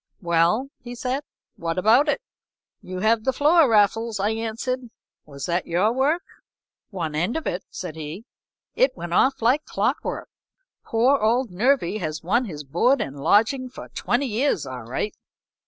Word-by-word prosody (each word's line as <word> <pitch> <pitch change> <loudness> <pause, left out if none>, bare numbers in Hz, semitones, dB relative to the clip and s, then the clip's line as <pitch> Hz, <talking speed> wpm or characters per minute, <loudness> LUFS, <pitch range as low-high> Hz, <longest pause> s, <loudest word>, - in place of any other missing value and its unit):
"Well," 170 +9 +2
he 245 0 -8
said, 255 +3 -2 0.3
"what 165 0 -3
about 230 - +4
it?" 295 - 0 0.6
"You 185 0 -6
have 220 +1 +3
the 265 - +2
floor, 300 +1 +4
Raffles," 220 +1 +2
I 205 +3 +1
answered. 230 +3 -3 0.4
"Was 140 -2 -7
that 175 0 -1
your 185 +7 +2
work?" 290 +7 +1 0.7
"One 170 -7 -4
end 175 - 0
of 320 - -5
it," 180 - -2
said 175 -4 -6
he. 160 +7 -7 0.5
"It - - +2
went 175 0 -5
off 260 +5 +3
like 260 +6 +3
clock - - -1
work. - - -4 0.6
Poor 250 +5 +3
old 230 +1 +1
Nervy 215 0 +1
has 155 -3 -4
won 235 +9 +2
his 150 -8 -7
board 175 - +2
and 140 +1 -4
lodging 225 - +2
for 255 - -10
twenty 245 +4 -1
years 240 - 0
all 130 -2 -6
right." 130 - -3
220 Hz, 165 wpm, -24 LUFS, 175-255 Hz, 0.7 s, about